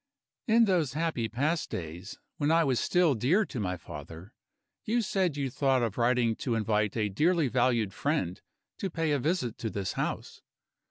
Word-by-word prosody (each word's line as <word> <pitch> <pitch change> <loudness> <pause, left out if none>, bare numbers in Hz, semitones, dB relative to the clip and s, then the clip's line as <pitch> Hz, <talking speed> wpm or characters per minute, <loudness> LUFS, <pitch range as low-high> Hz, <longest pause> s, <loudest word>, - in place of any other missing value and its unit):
"In 230 +1 +5
those 170 - +1
happy 155 -8 -1
past 150 +9 -1
days, 85 +4 -6 0.2
when 145 0 0
I 165 +1 +4
was 130 -5 +1
still 175 -4 +3
dear 150 - +2
to 130 - -6
my 90 -3 -2
father, 80 - -10 0.5
you 235 +1 +1
said 185 -6 0
you 135 -3 -2
thought 135 -2 +2
of 115 -4 -1
writing 120 -1 +2
to 120 -4 -1
invite 110 -1 0
a 105 -2 +1
dearly 155 - +2
valued 120 -4 +1
friend 105 - -1 0.4
to 195 - -2
pay 165 -2 -1
a 145 - +2
visit 140 -5 -1
to 115 - -2
this 100 -3 -3
house. - - -4
130 Hz, 175 wpm, -29 LUFS, 110-165 Hz, 0.5 s, In